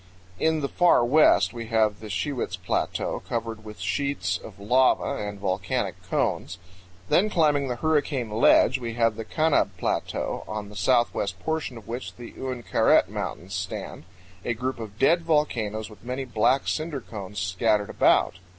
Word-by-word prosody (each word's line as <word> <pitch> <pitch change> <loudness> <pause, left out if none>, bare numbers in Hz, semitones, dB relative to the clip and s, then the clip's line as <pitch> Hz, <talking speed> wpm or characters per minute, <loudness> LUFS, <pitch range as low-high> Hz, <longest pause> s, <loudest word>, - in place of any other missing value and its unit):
In 160 -1 +2
the 140 - 0
far 175 -6 +4
west 150 +2 +4
we 115 -1 -6
have 110 -2 +2
the 110 - -9
Shiwits 110 -2 -2
Plateau 90 -1 -2
covered 115 -1 -4
with 105 -1 -10
sheets 95 -3 -1
of 100 -2 -12
lava 125 +2 +2
and 100 -1 -7
volcanic 95 -1 -2
cones; 90 - -1 0.5
then 210 +4 +4
climbing 150 -7 +2
the 125 - -2
Hurricane 145 -5 0
Ledge 115 +4 +4
we 115 -2 -5
have 115 -2 +2
the 115 - -5
Kanab 155 +4 +2
Plateau, - - -2
on 105 -1 -5
the 105 - -12
southwest 100 -2 +1
portion 160 -6 -2
of 110 - -13
which 120 +2 -6
the 120 -1 -10
Uinkaret 125 -7 +2
Mountains 95 +3 -5
stand 90 -2 -5 0.4
a 120 - -1
group 130 +2 -3
of 105 -2 -8
dead 165 +8 +4
volcanoes 120 -10 0
with 105 -1 -15
many 130 +2 -4
black 125 +3 +2
cinder 155 -3 -2
cones 100 -2 -8
scattered 100 +3 +1
about. 85 - +3
115 Hz, 160 wpm, -25 LUFS, 105-135 Hz, 0.5 s, far